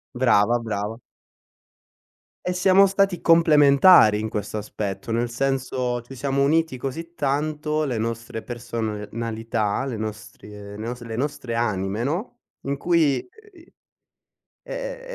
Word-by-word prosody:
Brava 120 Hz, -2 st, +3 dB
brava. 110 Hz, 0 st, -4 dB, 1.5 s
E 180 Hz, -, 0 dB
siamo 190 Hz, +2 st, +5 dB
stati 195 Hz, -1 st, +1 dB
complementari 150 Hz, -, +6 dB
in 110 Hz, -, -3 dB
questo 105 Hz, +1 st, -4 dB
aspetto, 100 Hz, 0 st, -5 dB
nel 120 Hz, +1 st, 0 dB
senso, 125 Hz, -1 st, -1 dB
ci 135 Hz, +3 st, -12 dB
siamo 140 Hz, +2 st, -1 dB
uniti 160 Hz, -2 st, +1 dB
così 165 Hz, +7 st, -6 dB
tanto 150 Hz, +1 st, -1 dB
le 125 Hz, -6 st, -2 dB
nostre 115 Hz, 0 st, -4 dB
personalità, 115 Hz, -1 st, -3 dB
le 125 Hz, -5 st, -4 dB
nostri 105 Hz, -1 st, -7 dB
le 105 Hz, 0 st, -10 dB
nostre 120 Hz, +2 st, -6 dB
le 110 Hz, -, -4 dB
nostre 130 Hz, -4 st, -3 dB
anime, 105 Hz, -1 st, -1 dB
no, 180 Hz, -, -3 dB, 0.2 s
in 140 Hz, 0 st, -3 dB
cui, 165 Hz, -, +1 dB, 0.2 s
uhm, 350 Hz, -, -18 dB
i 340 Hz, -, -23 dB, 0.9 s
è -, -, -6 dB
125 Hz, 125 wpm, -23 LUFS, 110-150 Hz, 1.5 s, complementari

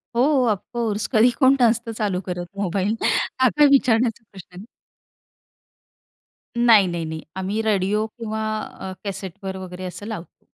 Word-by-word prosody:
हो, 235 Hz, -, +3 dB, 0.3 s
ऑफकोर्स 215 Hz, 0 st, -2 dB
कधी 230 Hz, 0 st, +5 dB
कोण 265 Hz, -1 st, +6 dB
नसतं 230 Hz, 0 st, +2 dB
चालू 195 Hz, -4 st, -1 dB
करत 180 Hz, -1 st, -4 dB
मोबाईल. 200 Hz, +2 st, 0 dB, 0.5 s
हा 255 Hz, -, +6 dB
काय 295 Hz, -, +7 dB
विचारण्याचा 235 Hz, -4 st, +3 dB
प्रश्न 185 Hz, -2 st, -13 dB
आहे. 190 Hz, +4 st, -9 dB, 1.9 s
नाही, 230 Hz, -5 st, +6 dB
नाही, 170 Hz, -2 st, -3 dB
नाही 160 Hz, 0 st, -5 dB
.आम्ही 195 Hz, +3 st, -2 dB
रेडिओ 210 Hz, 0 st, +1 dB
किंवा 220 Hz, -1 st, -5 dB, 0.2 s
अ, 190 Hz, -2 st, -8 dB
कॅसेटवर 195 Hz, -1 st, -6 dB
वगैरे 185 Hz, -1 st, -8 dB
असं 180 Hz, +3 st, -7 dB
लावतो, 210 Hz, -6 st, -8 dB
205 Hz, 135 wpm, -22 LUFS, 185-230 Hz, 1.9 s, काय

